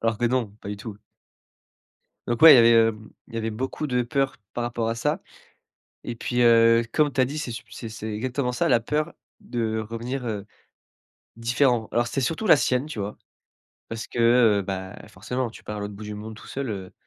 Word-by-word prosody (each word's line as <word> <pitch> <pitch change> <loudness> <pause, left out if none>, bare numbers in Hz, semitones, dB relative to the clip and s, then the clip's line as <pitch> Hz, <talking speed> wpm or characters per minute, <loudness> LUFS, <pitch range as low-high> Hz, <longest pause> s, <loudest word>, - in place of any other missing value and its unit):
Alors 115 -1 0
que 120 - 0
non, 120 -3 0
pas - - -8
du 105 - -4
tout 105 0 -8 1.3
donc 120 +2 -1
ouais, 160 -2 +11
il - - +9
y - - +7
avait, 115 0 +7 0.2
hem, 110 0 -9 0.2
il 115 - -11
y - - -1
avait 115 0 -2
beaucoup 130 +6 -3
de 125 -3 +1
peur 135 +2 -1 0.2
par 120 - -2
rapport 115 -1 -2
à 115 - -1
ça - - -1 0.8
et 120 - -4
puis, 120 +1 -1
heu, 115 0 +6
comme 150 -2 +2
tu 135 - +1
as - - +5
dit 145 +4 -4
c'est 150 -5 -4
sup 115 0 -7
c'est 115 - -7
c'est 110 0 -6
exactement 125 +3 -2
ça, 125 - 0
la 120 -3 +5
peur 150 +6 -2 0.3
de 110 -2 -2
revenir, 120 +4 -5
heu, 105 -3 -4 0.9
différent. 120 0 +1
Alors 120 0 +1
c'était 135 - -2
surtout 165 - -1
la 155 - +8
sienne 130 +1 +1
tu 155 - -8
vois. 100 +1 -4 0.7
Parce 115 -1 -5
que, - - -7
heu, 115 -3 +5
bah, 95 0 -5
forcément 125 0 -3
tu - - -14
pars 105 - -6
à 105 - -5
l'autre 100 0 -5
bout 105 - -10
du 105 0 -6
monde 110 +1 -7
tout - - -13
seul, 135 -1 -4
heu, 95 -3 -6
115 Hz, 220 wpm, -25 LUFS, 110-125 Hz, 1.3 s, ouais